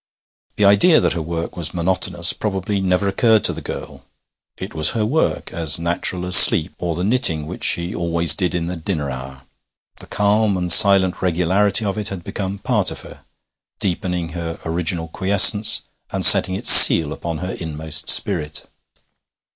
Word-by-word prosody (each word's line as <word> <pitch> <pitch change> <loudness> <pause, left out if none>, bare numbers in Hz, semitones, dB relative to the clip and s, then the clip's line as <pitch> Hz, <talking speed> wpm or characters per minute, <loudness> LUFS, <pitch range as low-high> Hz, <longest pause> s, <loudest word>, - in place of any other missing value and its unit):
The 105 - -1
idea 100 - +3
that - - -2
her 85 - -6
work 85 +1 -8
was 85 -1 -2
monotonous 90 0 0
probably 100 -1 -5
never 95 +1 -2
occurred 110 +1 0
to - - -1
the - - -11
girl. - - -10 0.6
It - - -10
was 80 0 +2
her 110 - -2
work 150 +9 -4
as 80 -1 +1
natural 85 +2 -5
as 90 0 +3
sleep, 80 +4 +5
or 85 -2 -5
the 90 - -6
knitting 95 - -1
which 90 +4 -10
she 85 +1 -1
always 85 -1 +1
did 90 -2 -4
in 85 -1 -4
the 90 +2 -7
dinner 80 -4 -6
hour. 65 +1 -11 0.6
The - - -14
calm 105 0 -2
and 90 -1 -3
silent 95 -1 +4
regularity 95 +4 -1
of 100 +1 -5
it 105 - -3
had 95 -3 -10
become 95 +1 -7
part - - -3
of - - -6
her, - - -16 0.6
deepening 90 -2 -5
her 85 0 -8
original 85 0 -4
quiescence, 100 +4 +2 0.3
and - - -1
setting 95 - +5
its - - +5
seal 80 -3 +8
upon 85 -2 -8
her 90 +3 -8
inmost 80 -1 -5
spirit. 75 -7 0
90 Hz, 170 wpm, -16 LUFS, 85-100 Hz, 0.6 s, seal